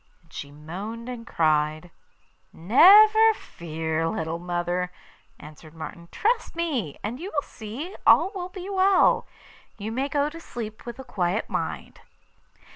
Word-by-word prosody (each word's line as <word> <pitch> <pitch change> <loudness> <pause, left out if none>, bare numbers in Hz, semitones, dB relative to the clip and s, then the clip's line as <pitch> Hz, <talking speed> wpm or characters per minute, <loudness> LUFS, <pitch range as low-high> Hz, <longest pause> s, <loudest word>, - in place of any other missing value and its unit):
and 165 - -26
she 140 - -7
moaned 190 +11 -7
and 240 -2 -7
cried. 155 +1 +1 0.6
'Never 425 - +7
fear, 160 - -3
little 160 +1 -3
mother,' 175 +1 -2 0.5
answered 155 +1 -13
Martin; 170 +1 -8
'trust 455 -2 0
me, 275 - -2
and 230 +5 -4
you 365 +4 -6
will 290 - 0
see 245 - -8
all 385 - +6
will 365 -2 -5
be 370 0 -8
well. 390 0 +3 0.5
You 215 +1 -5
may 265 +5 -1
go 285 0 +1
to 330 +2 -8
sleep 225 -7 -8
with 235 - -6
a 265 - -8
quiet 185 -3 -2
mind. - - -4
215 Hz, 140 wpm, -25 LUFS, -, 0.6 s, Never